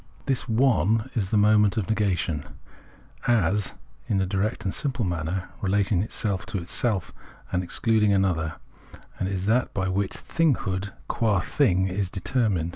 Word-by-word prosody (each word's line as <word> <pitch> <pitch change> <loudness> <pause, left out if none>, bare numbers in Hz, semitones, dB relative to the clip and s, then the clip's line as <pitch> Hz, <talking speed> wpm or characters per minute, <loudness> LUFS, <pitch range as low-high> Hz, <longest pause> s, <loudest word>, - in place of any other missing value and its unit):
The 135 - +2
" - - -21
One 115 -2 +2
" - - -27
is 100 -7 -1
the 105 - +2
moment 105 0 +4
of 100 -5 0
negation, 95 -8 0 0.8
as, 105 -4 +2 0.3
in 100 - +1
a 95 - +1
direct 100 +4 -1
and 95 - -1
simple 135 -5 -1
manner, 90 +1 -2
relating 100 -1 +2
itself 100 -2 -1
to 110 -2 -3
itself, 95 +3 -1 0.4
and 90 - +1
excluding 105 +3 +2
an 100 -1 +3
other: 80 -4 -1 0.6
and 95 - -1
is 95 -1 -2
that 120 +4 +1
by 95 - 0
Vvfliich 95 +1 -1 0.4
" - - -9
Thinghood 95 +1 -3
" - - -28
qua 105 -5 +1
Thing 95 - +2
is 95 0 -1
determined. 95 -4 0
100 Hz, 170 wpm, -25 LUFS, 95-110 Hz, 0.8 s, moment